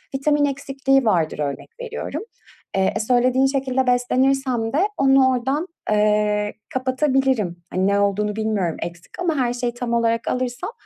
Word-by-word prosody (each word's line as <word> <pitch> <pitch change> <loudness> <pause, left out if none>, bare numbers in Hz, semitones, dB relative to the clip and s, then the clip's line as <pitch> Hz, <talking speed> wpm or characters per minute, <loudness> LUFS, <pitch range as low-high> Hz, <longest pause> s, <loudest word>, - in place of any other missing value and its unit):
vitamin 290 +2 +2
eksikliği 270 -1 0
vardır 165 -8 +1
örnek 145 - -4
veriyorum. 465 -3 -5 0.5
Eee, 190 0 +2
e, - - 0
söylediğin 250 +3 +3
şekilde 265 -1 0
beslenirsem 250 -1 +1
de 290 - +2 0.2
onu 270 -1 +5
oradan, 265 +7 -1 0.2
eee, 210 0 +2 0.2
kapatabilirim. 260 - 0
Hani, 185 +1 +1
ne 200 0 +2
olduğunu 200 +1 0
bilmiyorum. 215 -6 -1
Eksik 175 - -8
ama 345 -3 0
her 245 -2 +1
şeyi 245 -1 -2
tam 240 0 -4
olarak 230 0 +1
alırsam 250 - -2
245 Hz, 145 wpm, -22 LUFS, 210-270 Hz, 0.5 s, onu